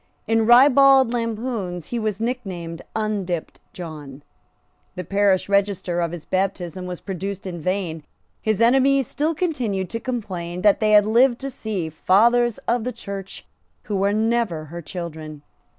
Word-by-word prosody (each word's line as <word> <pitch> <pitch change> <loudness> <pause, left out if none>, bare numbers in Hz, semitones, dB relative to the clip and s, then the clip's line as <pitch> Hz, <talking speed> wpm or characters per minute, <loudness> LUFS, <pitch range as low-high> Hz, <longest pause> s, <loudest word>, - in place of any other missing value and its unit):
In 225 0 +2
ribald 265 0 +6
lampoons 225 -7 -3
he 240 - -2
was 215 -2 -2
nicknamed 190 -9 -4
Undipped 200 -6 -3
John. 150 -5 -9 0.7
The 180 - -4
parish 200 +1 +2
register 200 -3 0
of 170 -1 -1
his 170 -3 -8
baptism 185 -2 -2
was 180 -1 -6
produced 195 0 -5
in 175 -3 -6
vain. 180 -2 -2 0.4
His 215 -1 0
enemies 270 +2 +4
still 305 +7 -1
continued 240 - -2
to 230 - -3
complain 185 -8 -5
that 205 -2 +5
they 215 -1 +2
had 210 -1 +7
lived 240 +3 +4
to 275 0 -4
see 215 -9 -4
fathers 235 +8 +3
of 235 -1 +1
the 250 - -2
Church 195 -4 -8 0.4
who 200 -1 0
never 225 -3 +1
were - - -9
her 170 +3 -8
children. 155 -3 -7
200 Hz, 150 wpm, -22 LUFS, 180-235 Hz, 0.7 s, had